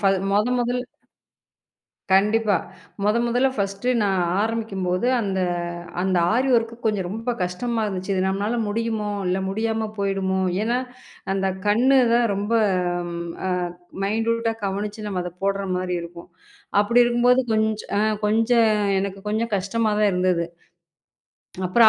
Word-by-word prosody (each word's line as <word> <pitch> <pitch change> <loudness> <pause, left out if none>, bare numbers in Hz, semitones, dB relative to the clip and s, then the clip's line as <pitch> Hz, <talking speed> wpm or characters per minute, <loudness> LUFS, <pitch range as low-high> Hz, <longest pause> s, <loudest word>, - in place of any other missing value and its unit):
ஃபல் 195 -2 +3
மொத 210 +3 +3
மொதல் 245 +1 0 1.3
கண்டிப்பா. 210 +1 +3 0.5
மொத 210 +3 +3
மொதல்ல 245 +3 +2
ஃபர்ஸ்டு 200 +3 -1
நான் 195 -3 +1 0.2
ஆரம்பிக்கும்போது, 210 -3 -1
அந்த 195 -2 -1 0.6
அந்த 185 -1 +1 0.2
ஆரி 260 +3 +2
வொர்க் 230 0 +2
கொஞ்ச 210 -2 +1
ரொம்ப 225 +5 -2
கஷ்டமா 225 +6 -2
இருந்துச்சு. 195 -1 -3
இது 185 - +1
நம்மனால 200 +5 -1
முடியுமோ? 220 -1 -1 0.2
இல்ல 185 +1 +1
முடியாம 220 +1 -1
போயிடுமோ? 195 -1 0 0.2
ஏன்னா 235 +2 +1 0.6
அந்தக் 190 -1 -1
கண்ணுதான் 240 +1 +4
ரொம்ப, 205 +3 -2 0.9
ஆ, - - 0 0.5
மைன்டூட்டா 225 +2 0
கவனிச்சு 205 +2 -3
நம்ம 190 -3 -2
அதப் 180 0 -8
போடுற 200 0 0
மாரி 180 -1 -2
இருக்கும். 170 0 -11 0.5
அப்டி 235 +4 +3
இருக்கும்போது 240 +1 +4
கொஞ் 220 0 +3 0.3
அ, - - +3 0.3
கொஞ்ச 225 +3 +2 0.5
எனக்குக் 195 +1 -5
கொஞ்சம் 220 +1 -1
கஷ்டமா 215 +4 0
தான் 210 -1 +4
இருந்தது. 180 -2 +1 1.2
அப்புறம் 220 +5 +6
210 Hz, 125 wpm, -23 LUFS, 195-230 Hz, 1.3 s, அப்புறம்